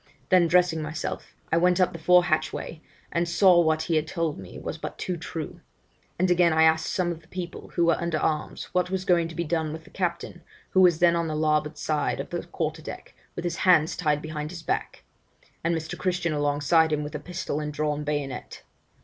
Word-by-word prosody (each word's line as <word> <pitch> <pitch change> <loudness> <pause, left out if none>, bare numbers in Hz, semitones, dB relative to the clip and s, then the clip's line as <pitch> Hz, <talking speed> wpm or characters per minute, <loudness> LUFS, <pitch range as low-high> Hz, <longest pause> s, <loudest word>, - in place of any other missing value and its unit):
Then 180 -2 +5
dressing 175 -1 +3
myself, 155 +1 -5 0.2
I 165 - +3
went 180 +2 +3
up 185 - +3
the 165 - -7
fore 180 +2 +5
hatchway, 155 0 -2 0.3
and 170 0 0
saw 180 0 +6
what 160 -1 +1
he 160 0 +1
had 155 0 -1
told 165 - -2
me 95 -2 -10
was - - -6
but - - -6
too 180 - -3
true; 160 -2 -6 0.6
and 185 +1 +2
again, 175 -1 +4
I 160 0 +4
asked 160 0 +3
some 180 -2 0
of 165 -1 -7
the 160 - -23
people, 180 0 -7
who 170 - +3
were 170 +1 +2
under 170 -2 0
arms, 155 0 -1
what 180 0 +1
was 190 0 -2
going 170 -3 +3
to 165 - -10
be 170 - -1
done 160 -1 -1
with 160 +1 -7
the - - -18
captain, 175 -1 -3 0.3
who 190 - +4
was 175 -3 +6
then 170 0 +4
on 170 -1 0
the 155 - -3
larboard 150 0 +1
side 155 -1 -1
of - - -6
the - - -2
quarter - - -3
deck, - - -9 0.2
with 175 - -5
his 170 -1 -2
hands 170 -4 +4
tied 150 -3 0
behind 155 -1 -4
his 170 -1 -8
back, - - -3 0.6
and 170 +1 +1
Mr. 160 -1 -4
Christian 180 -3 -1
alongside 145 +2 +2
him 150 -1 0
with 150 - -6
a 150 - -3
pistol 170 -1 -4
and 150 -1 -3
drawn 150 0 -1
bayonet. 145 -3 -4
165 Hz, 220 wpm, -26 LUFS, 155-175 Hz, 0.6 s, saw